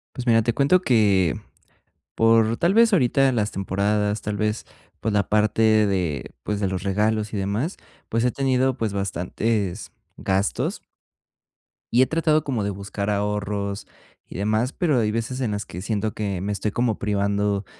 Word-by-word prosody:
Pues, 125 -1 -6
mira, 115 -1 +5
te 120 +1 0
cuento 145 +8 +3
que 100 - +3 0.8
por, 115 0 +3
tal 170 +7 +2
vez, 230 +1 +5
ahorita 135 -2 +3
las 105 -3 0
temporadas, 105 +2 -1
tal 105 -1 -3
vez, 105 +1 -1 0.4
pues, 110 - -1
la 100 -2 +1
parte 105 +1 +1 0.3
de, 90 -8 -2
pues, 105 -1 -2
de 100 -2 0
los 95 0 -4
regalos 105 +2 0
y - - -1
demás, 100 - -2 0.3
pues, 115 +1 0
he 125 - +3
tenido, 130 -1 +1
pues, 110 -5 -3
bastantes 100 +1 -2 0.2
gastos. 95 +2 -1 1.1
Y 120 - +5
he 130 - +4
tratado 155 -2 +2
como 125 -7 -1
de 100 - -1
buscar 100 +1 -4
ahorros 105 0 -2 0.4
y - - -10
demás, 110 +5 0
pero 160 -7 +1
hay 105 -2 +1
veces 115 +4 -3
en 120 -4 -1
las 105 0 -3
que 90 - -8
siento 105 +1 -2
que 100 -3 -3
me 100 +3 -2
estoy 105 +1 -2
como 120 -1 0
privando 100 0 0
105 Hz, 170 wpm, -23 LUFS, 100-120 Hz, 1.1 s, mira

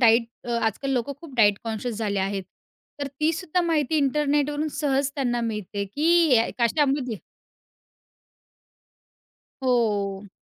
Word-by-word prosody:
Diet 230 -1 +6 0.2
अ, 240 - -5 0.2
आजकाल 245 +5 -2
लोकं 255 +2 -1
खूप 310 -6 -11
डाएट 205 -3 +5
कॉन्शियस 225 0 -3
झाले 205 -3 -1
आहेत, 195 0 -1 0.6
तर 285 - -1
तीसुद्धा 330 +3 +1
माहिती 315 -3 +1
इंटरनेटवरून 295 +1 +1
सहज 280 -1 +1
त्यांना 245 -4 0
मिळते 210 -3 -3
की 310 +3 +1 0.3
या 230 0 +4
कशामध्ये 265 -1 +1 2.5
हो. 205 -5 0
250 Hz, 115 wpm, -25 LUFS, 220-290 Hz, 2.5 s, डाएट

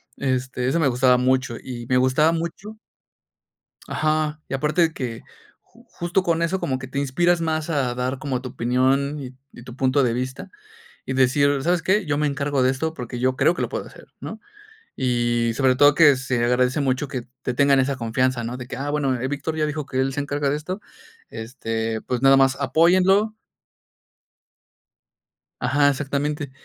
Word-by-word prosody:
Este, 130 -1 -2
eso 140 +6 +1
me 155 - +3
gustaba 125 0 +3
mucho, 130 -1 +1
y 120 -2 -7
me 125 - +3
gustaba 130 +5 +3
mucho. 170 +6 -5 1.1
Ajá. 155 0 0
Y - - -4
aparte 150 +6 +1
de 160 - +2
que 120 -3 -5 0.4
ju - - -23
justo 175 +2 -1
con 170 -2 0
eso, 180 +3 0
como 130 -1 -1
que 135 - -8
te 140 +2 -5
inspiras 175 +6 +1
más 160 0 -2
a 130 -5 0
dar 125 +2 -2
como 130 -4 -3
tu 125 0 -7
opinión 130 +4 +1
y 130 -1 -8 0.2
y 120 - -11
tu 125 0 -11
punto 135 +1 +2
de 120 -3 +1
vista, 130 +2 -4 0.5
y 130 - -4
decir, 140 +2 +3
¿sabes 175 -1 +1
qué? 190 +2 +1
yo 145 -1 0
me 150 - +1
encargo 140 -1 -1
de 130 - +4
esto, 160 +4 -2
porque 125 -3 -6
yo 130 +1 +1
creo - - +4
que - - -3
lo - - -1
puedo - - -4
hacer, - - -14
¿no? - - -7 0.6
Y 120 -2 0
sobre 130 -1 +3
todo 145 +1 +6
que 145 -5 +6
se 125 -2 -1
agradece 125 +4 +2
mucho 135 +1 0
que 125 -3 -6 0.2
te 125 - -2
tengan 140 +1 +4
esa 135 +1 +1
confianza, 125 +1 -1
¿no? 120 +2 -4
De 125 - -8
que, - - -6
ah, 140 +3 -4
bueno, 140 -3 0
Víctor 145 +3 -3
ya 155 -1 0
dijo 150 -1 -3
que 130 -2 -1
él 135 0 0
se 145 - -3
encarga 145 0 -1
de 145 - 0
esto, 185 +7 -6 0.5
este, 115 -1 -4
pues 125 -1 -3
nada 135 0 +6
más 135 0 +3
apóyenlo 185 +8 +3 2.3
Ajá, 145 +3 +3
exactamente. 145 +1 -2
135 Hz, 190 wpm, -23 LUFS, 125-150 Hz, 2.3 s, todo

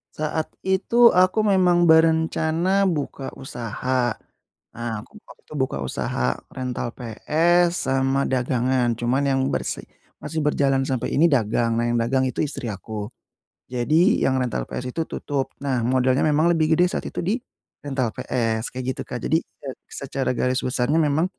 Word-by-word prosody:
Saat 155 +1 -2 0.2
itu 215 +5 +4
aku 185 +4 +3
memang 180 -4 +4
berencana 160 +4 +3
buka 145 -5 -3
usaha. 120 -1 -2 0.6
Nah, 120 0 -4
aku 210 - -16
waktu - - -16
itu - - -12
buka 130 - -1
usaha 65 -1 -2 0.2
rental 125 -2 -4
PS 170 +9 +1
sama 135 +1 +1
dagangan. 125 -1 +1
Cuman 125 +4 0
yang 135 -1 +2
bersi - - -2 0.4
masih 160 - -4
berjalan 135 -2 +2
sampai 130 -3 -2
ini 170 - +6
dagang. 115 -4 +1
Nah, 120 0 +1
yang 120 - +1
dagang 130 +3 +1
itu - - -13
istri 135 -5 -5
aku. 105 +2 -6 0.6
Jadi 155 +9 +3
yang 130 - +1
rental 120 - -1
PS 125 0 -5
itu 165 +3 -3
tutup, 140 -2 -3
nah 130 -3 0
modalnya 130 +1 +2
memang 155 +3 +3
lebih 160 -1 +2
gede 180 - +5
saat - - -3
itu - - -18
di 215 +8 0 0.4
rental 130 -5 -1
PS 115 -2 -1
kayak 130 -1 -4
gitu, - - -7
Kak. 125 - -4
Jadi, 160 - +3
e 140 - -15 0.2
secara 135 -1 -3
garis 130 0 +1
besarnya 125 +5 +1
memang, 155 +3 +2
135 Hz, 155 wpm, -23 LUFS, 125-160 Hz, 0.6 s, ini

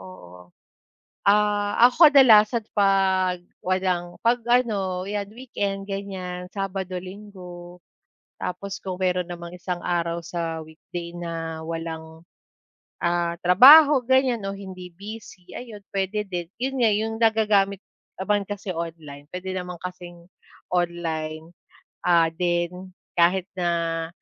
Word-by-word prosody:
oo. 90 -1 -13 0.8
Ah, 205 0 +2
ako 300 +5 +7
kadalasan 230 -5 +6
'pag 190 -2 +2 0.2
walang 180 -1 -1
'pag 240 +1 +3
ano, 200 -7 +1
'yan 200 0 -3
weekend 200 -5 -4
ganyan, 185 -2 -6
Sabado, 195 -2 -4
Linggo. 180 -2 -10 0.6
Tapos 195 +2 -5
kung 185 -2 -5
meron 180 -1 0
namang 170 -1 -8
isang 180 0 -4
araw 170 -1 -1
sa 165 -1 -4
weekday 170 +2 -8
na 165 -2 -5
walang, 160 0 -6 0.8
ah, 170 0 0
trabaho 275 - +9
ganyan 260 -1 +2
o 195 - -4
hindi 185 -3 -10
busy, 205 -2 -10
ayun 220 -5 -9
puwede 200 +2 -1
din, 175 -3 -5
yun 265 +3 -2
nga 235 -2 +4
yung 215 +2 0
nagagamit 210 -3 +3 0.4
naman 205 +2 +1
kasi 205 -2 -5
online, 160 -4 -7
puwede 185 +2 -5
naman 180 -1 -5
kasing 175 -1 -9 0.5
online, 165 -2 -2 0.5
ah, 170 -2 +4
din 175 +2 -2 0.3
kahit 180 +2 +3
na 170 -2 -1
185 Hz, 115 wpm, -24 LUFS, 170-205 Hz, 0.8 s, trabaho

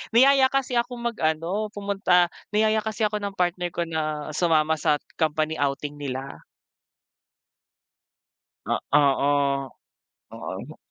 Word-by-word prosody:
Niyaya 265 +2 +6
kasi 260 -2 -1
akong 240 0 -4
mag-ano, 170 +3 -1
pumunta, 195 -3 +2 0.2
niyaya 215 +1 +3
kasi 220 0 -3
ako 210 0 +1
ng 200 -1 -5
partner 180 0 0
ko 170 - 0
na 155 -2 -3
sumama 160 -1 +2
sa 150 - +3 0.2
company 155 0 0
outing 145 +1 -2
nila. 135 -1 -5 2.3
A - - 0 0.2
oo, 140 -1 +2 0.6
oo. - - -7
170 Hz, 110 wpm, -25 LUFS, 150-210 Hz, 2.3 s, Niyaya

